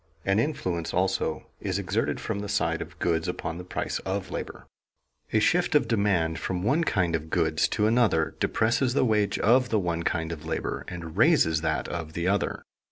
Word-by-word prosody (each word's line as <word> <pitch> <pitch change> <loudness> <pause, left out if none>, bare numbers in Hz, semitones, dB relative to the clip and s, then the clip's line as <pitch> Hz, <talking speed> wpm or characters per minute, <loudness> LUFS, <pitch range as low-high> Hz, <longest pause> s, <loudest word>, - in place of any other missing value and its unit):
An 95 +2 +3
influence 95 - -2
also 95 -3 0
is - - -2
exerted - - -1
from 100 - -3
the 105 0 -5
side - - 0
of - - -8
goods 80 -1 0
upon 80 +1 -4
the - - -6
price 90 - -3
of - - -4
labor. - - -6 0.7
A 110 - +3
shift 175 +9 +2
of 150 - +4
demand 95 -8 +1
from 90 +1 -3
one 140 +10 +2
kind 90 - +1
of 80 0 -4
goods 80 -2 +2
to 105 -1 0
another 110 -8 +2
depresses 120 +3 +1
the 130 - +3
wage 105 -3 +1
of 125 +3 +3
the 110 - +2
one 85 -4 -1
kind 80 -1 -1
of 80 -2 -6
labor 80 - -3
and 85 -1 -7
raises 110 - +4
that 80 - -1
of 85 -2 -5
the 85 +1 -2
other. 100 +1 0
95 Hz, 190 wpm, -27 LUFS, 80-110 Hz, 0.7 s, of